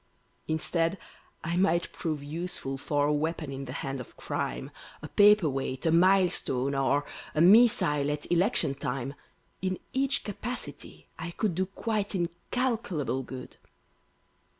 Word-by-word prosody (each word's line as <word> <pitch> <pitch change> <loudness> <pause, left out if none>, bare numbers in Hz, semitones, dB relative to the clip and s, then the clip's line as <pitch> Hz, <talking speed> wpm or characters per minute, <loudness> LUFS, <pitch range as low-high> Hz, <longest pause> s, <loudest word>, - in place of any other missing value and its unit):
Instead, 165 +3 0 0.5
I 170 +1 -1
might 175 -2 +2
prove 155 -4 -3
useful 150 -3 -4
for 145 +1 +1
A 150 - +2
weapon 155 -1 -1
in 135 0 -5
the 130 - -6
hand 135 0 -3
of 125 - -13
Crime, 60 +1 -3 0.3
A - - -4
paperweight, 165 -11 +3
a 160 - +4
milestone, 170 -7 +3
or 140 +1 +2 0.3
A 155 - +3
missile 175 -8 +6
at 150 +2 -3
Election 175 - +2
time; 135 -1 -3 0.5
In 185 -1 -1 0.2
each 275 +1 +1
capacity 230 +4 -6
I 170 - -4
could 195 +2 -1
Do 185 +3 0
quite 205 0 -2
incalculable 175 - -1
good. 130 0 -9
165 Hz, 130 wpm, -29 LUFS, 140-190 Hz, 0.5 s, missile